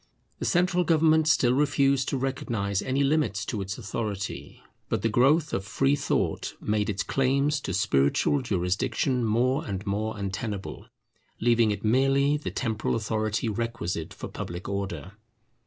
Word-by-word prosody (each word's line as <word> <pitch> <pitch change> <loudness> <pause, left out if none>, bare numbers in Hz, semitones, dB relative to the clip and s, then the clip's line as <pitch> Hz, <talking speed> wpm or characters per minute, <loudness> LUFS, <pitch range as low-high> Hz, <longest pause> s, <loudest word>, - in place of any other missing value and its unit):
The - - -3
central 180 0 +2
government 160 -1 +3
still 125 -4 +4
refused 140 -1 +2
to 135 - -1
recognize 115 -7 -2
any 135 +2 0
limits 150 +2 +1
to 110 -5 -3
its 95 0 -4
authority; 105 -3 -5 0.3
but - - -1
the 115 - +2
growth 140 +8 +3
of 95 - -1
free 135 +7 +1
thought 145 - -1
made 105 0 0
its 100 -1 -1
claims 140 +2 +1
to - - -4
spiritual 100 - +2
jurisdiction 115 +5 0
more 120 +4 +1
and 100 0 -5
more 110 +2 -2
untenable, 100 0 -5 0.5
leaving 115 -1 +3
it 105 0 -3
merely 135 +5 +3
the 150 - -3
temporal 110 -4 -1
authority 110 0 -1
requisite 110 -7 -3
for - - -7
public 85 +2 -6
order. 95 -4 -4
115 Hz, 145 wpm, -27 LUFS, 100-135 Hz, 0.5 s, still